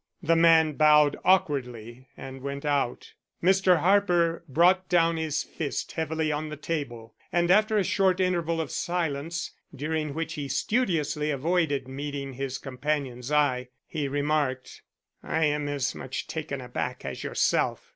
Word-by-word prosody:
The 165 +1 +3
man 165 -2 +5
bowed 150 -1 +5
awkwardly 130 - 0
and 135 0 -9
went 140 +1 -5
out. 140 -4 -1 0.3
Mr. 185 -1 +4
Harper 175 -4 +2
brought 180 +6 +3
down 165 -2 +3
his 160 -2 -1
fist 150 -4 -4
heavily 160 -1 -1
on 150 +1 -3
the 150 - -7
table, 135 -8 -5 0.2
and 175 0 +2
after 215 +2 +4
a 200 - +3
short 190 0 +2
interval 170 -3 0
of 160 -4 -3
silence, 165 -2 -2 0.2
during 155 +1 -3
which 160 0 -3
he 145 -3 -4
studiously 155 - 0
avoided 145 -2 0
meeting 140 0 -5
his 135 0 -4
companion's 135 -1 -3
eye, 135 -4 +2 0.2
he 150 -3 -3
remarked: 145 -2 -1 0.4
"I 160 0 0
am 150 0 0
as 140 -3 -1
much - - -5
taken - - -5
aback - - -4
as - - -5
yourself. - - 0
150 Hz, 145 wpm, -27 LUFS, 140-170 Hz, 0.4 s, man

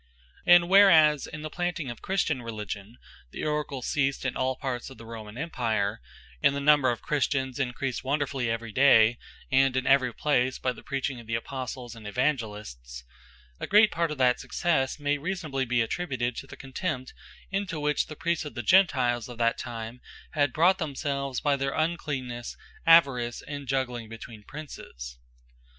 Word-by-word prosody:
And 175 0 +7
whereas 165 -7 +6
in 150 0 -8
the 155 - -4
planting 175 -6 -2
of 120 - -10
Christian 170 -8 0
Religion, 105 -1 -6 0.3
the - - -5
Oracles 150 -4 -2
ceased 135 -1 0
in 130 - -1
all 130 0 0
parts 125 -2 -4
of 130 - -13
the 115 - -12
Roman 110 -1 -9
Empire, 115 - -1 0.4
and 140 - +4
the - - -1
number 140 -2 +5
of 120 - -3
Christians 130 -2 -1
encreased 130 0 -2
wonderfully 135 -3 -1
every 115 0 -3
day, 120 -2 +5 0.3
and 135 -1 +4
in 130 - 0
every 130 -2 +4
place, 130 -1 +1
by 130 - -1
the - - -13
preaching 135 -2 -3
of 115 - -13
the 115 - -1
Apostles, 125 0 -5
and 110 -2 -10
Evangelists; 105 - -3 0.6
a - - -4
great 210 +1 +6
part 170 -1 0
of 150 - -5
that 125 -1 +3
successe, 155 -6 0
may 145 0 0
reasonably 155 -5 -2
be 120 -1 +2
attributed, 125 -3 -2
to 135 - -6
the - - -11
contempt, 130 -1 -4 0.4
into 195 -5 -2
which 150 0 0
the 155 - -8
Priests 170 +1 -1
of 150 - -8
the 120 - -4
Gentiles 125 - +3
of 120 - -9
that 115 0 +1
time, 115 +1 -6 0.3
had 145 -3 +1
brought 180 +7 +3
themselves, 140 -3 -3
by 145 -1 +2
their 135 0 -2
uncleannesse, 135 -7 -2 0.3
avarice, 135 -8 +4
and 145 -2 -7
jugling 125 -4 -2
between 115 -1 -10
Princes. 60 - -9
135 Hz, 170 wpm, -27 LUFS, 120-150 Hz, 0.6 s, And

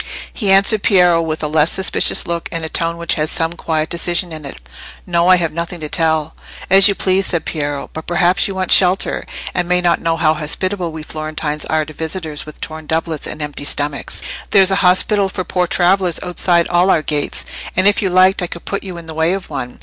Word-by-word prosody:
He 205 -5 -2
answered 200 +2 +4
Piero 180 -5 +4
with 160 -1 -3
a - - 0
less 155 +1 +2
suspicious 190 0 +2
look 170 -1 -3
and 165 -1 -3
a - - -4
tone 165 +1 -1
which 170 0 0
had 155 -1 -1
some 165 0 -1
quiet 160 -2 -2
decision 175 +1 0
in 155 -2 -8
it. 140 - -7 0.5
"No, 170 -1 +1
I 185 - +7
have 170 -3 -1
nothing 170 +1 -5
to 155 -1 -6
tell." 160 -1 0 0.4
"As 195 +1 +8
you 200 - +2
please," 190 0 +1
said 170 -3 -1
Piero, 145 -3 -3
"but 160 - -8
perhaps 175 +1 +2
you 195 - -6
want 185 -1 -2
shelter, 185 +1 +3 0.3
and 175 - -1
may 180 0 +3
not 175 -1 +1
know 165 0 0
how 155 -1 +2
hospitable 170 +4 -3
we 160 -1 -7
Florentines 155 -1 -4
are 155 -1 0
to 155 - -11
visitors 160 -2 -5
with 155 - -11
torn 155 -1 -7
doublets 160 -1 -2
and 155 - -5
empty 145 -1 -6
stomachs. 145 0 -2 0.3
There's 195 -1 +5
an 195 - +2
hospital 195 +2 +2
for 185 - -4
poor 180 0 -1
travellers 180 0 +1
outside 175 -1 +2
all 175 +2 +2
our 160 -4 +2
gates, 150 -2 -1 0.3
and, 185 +1 +5
if 205 - +3
you 195 - 0
liked, 185 +1 +4
I 180 - -2
could 170 - -9
put 200 - -3
you 185 -3 -7
in 170 - -10
the 160 - -8
way 160 +3 +1
to 195 - -1
one. 135 -7 -7
170 Hz, 225 wpm, -17 LUFS, 155-185 Hz, 0.5 s, As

